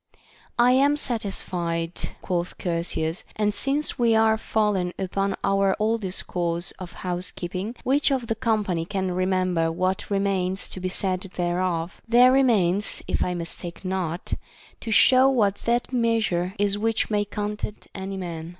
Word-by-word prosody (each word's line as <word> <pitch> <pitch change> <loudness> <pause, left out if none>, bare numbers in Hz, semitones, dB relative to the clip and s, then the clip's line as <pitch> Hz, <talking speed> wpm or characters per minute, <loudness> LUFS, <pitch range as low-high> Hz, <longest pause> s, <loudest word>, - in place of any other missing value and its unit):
I 245 +1 +5
am 280 +3 +4
satisfied, 180 - -2 0.3
quoth 175 -1 -2
Chersias, 170 +1 -2
and 210 -1 +1
since 280 +6 0
we 230 -2 +4
are 220 0 +4
fall 215 -1 0
en 180 -1 -1
upon 195 +1 -1
our 195 -1 +2
old 225 +2 +1
discourse 175 -2 -1
of 180 -2 -7
housekeeping, 180 +4 -3
which 280 +4 +3
of 265 -3 0
the 225 - 0
company 215 -7 0
can 190 +1 -2
remember 185 -2 +1
what 185 +4 -1
remains 195 -2 0
to - - -6
be 185 0 -2
said 185 -1 -1
thereof? 175 0 -1
There 245 +2 +6
remains, 210 -8 +2
if - - 0
I 180 - -2
mistake 170 +2 -5
not, 185 -2 -2 0.5
to - - -7
show 255 +5 +6
what 210 -7 +2
that 240 +2 0
meas 230 -3 +2
ure 175 +2 -1
is 205 0 +1
which 225 +1 0
may 205 -1 +2
content 210 +1 -5
any 195 0 -5
man. 170 -3 -5
195 Hz, 150 wpm, -25 LUFS, 180-225 Hz, 0.5 s, There